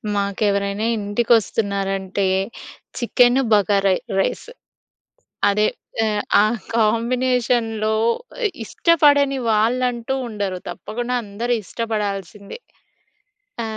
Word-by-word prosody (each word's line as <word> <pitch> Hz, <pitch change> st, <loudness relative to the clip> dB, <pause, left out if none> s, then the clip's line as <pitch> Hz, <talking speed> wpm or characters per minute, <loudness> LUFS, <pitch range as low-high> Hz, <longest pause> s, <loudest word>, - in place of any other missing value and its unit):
మాకెవరైనా 200 Hz, +1 st, 0 dB
ఇంటికి 210 Hz, +3 st, -2 dB
వస్తున్నారంటే 195 Hz, -2 st, -2 dB, 0.7 s
చికెన్, 245 Hz, +1 st, +3 dB
బగార 200 Hz, -1 st, +3 dB, 0.3 s
రైస్ 195 Hz, -, -1 dB, 1.0 s
అదే 210 Hz, +1 st, +2 dB, 0.3 s
ఆహ్, 215 Hz, -2 st, +1 dB, 0.2 s
ఆ -, -, +5 dB, 0.3 s
కాంబినేషన్‌లో 230 Hz, -1 st, +1 dB, 0.7 s
ఇష్టపడని 285 Hz, -, +3 dB
వాళ్ళంటూ 240 Hz, +3 st, 0 dB
ఉండరు. 200 Hz, -4 st, -3 dB
తప్పకుండా 245 Hz, +2 st, -4 dB
అందరూ 225 Hz, +4 st, -2 dB
ఇష్టపడాల్సిందే. 205 Hz, -, -4 dB, 1.0 s
త -, -, -2 dB
220 Hz, 75 wpm, -21 LUFS, 200-240 Hz, 1.0 s, ఆ